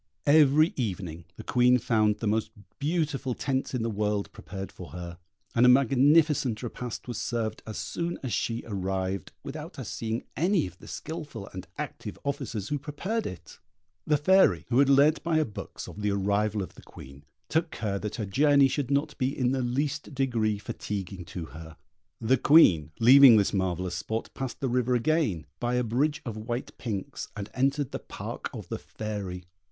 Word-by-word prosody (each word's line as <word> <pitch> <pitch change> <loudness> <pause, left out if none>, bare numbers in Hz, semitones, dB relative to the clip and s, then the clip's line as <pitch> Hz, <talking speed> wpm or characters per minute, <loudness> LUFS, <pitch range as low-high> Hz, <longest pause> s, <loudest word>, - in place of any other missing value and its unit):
Every 150 +2 +5
evening 90 - -3
the - - -9
Queen 125 0 +4
found 110 -3 +2
the 110 - -3
most 110 +1 +1 0.3
beautiful 145 -4 -1
tents 135 -1 -2
in 120 - -1
the 115 - 0
world 105 -1 -1
prepared 95 +3 -7
for - - -10
her, 85 0 -7 0.3
and 120 - +3
a 125 - +8
magnificent 135 -1 +4
repast 120 0 -6
was 120 - -4
served 110 -2 -2
as 110 - -5
soon 170 0 -3
as 130 - -2
she 115 0 -1
arrived, 95 -3 -3
without - - -7
her - - -6
seeing 115 +1 -3
any 180 +3 +2
of 90 0 -10
the - - -13
skilful 145 -10 -6
and 95 -1 -7
active - - -6
officers 115 -7 -3
who 145 - -1
prepared 185 +11 -3
it. 90 - -10 0.5
The 150 - +4
Fairy, 150 - +4
who 125 +1 +3
had 140 0 +5
learnt 145 +3 +5
by 170 -1 0
her 155 -1 +3
books 105 - -8
of 105 - -9
the 105 - +1
arrival 100 +1 +1
of 90 - -9
the - - -14
Queen, 70 +1 -13 0.2
took 160 +1 +1
care 105 -9 -3
that 105 0 -4
her 110 - -3
journey 140 +6 +4
should 135 -1 -2
not 145 +2 0
be 130 +1 0
in 125 -1 +2
the 135 -1 0
least 140 +4 -2
degree 115 -6 +1
fatiguing 100 -2 -5
to 85 -2 -6
her. 80 0 -10 0.4
The 120 +4 +3
Queen, 90 - +6
leaving 130 0 +9
this 100 - +2
marvellous 90 -2 -1
spot, 110 +4 -4
passed 130 -2 -5
the 135 - +1
river 125 0 +1
again, 120 - +1
by 120 0 0
a 125 - +2
bridge 135 +7 0
of 115 -3 -5
white 120 +3 -4
pinks, 105 -6 -4
and 100 0 -6
entered 135 +1 +1
the - - -4
park - - -6
of - - -8
the - - -3
Fairy. 100 -4 -6
120 Hz, 185 wpm, -28 LUFS, 100-140 Hz, 0.5 s, leaving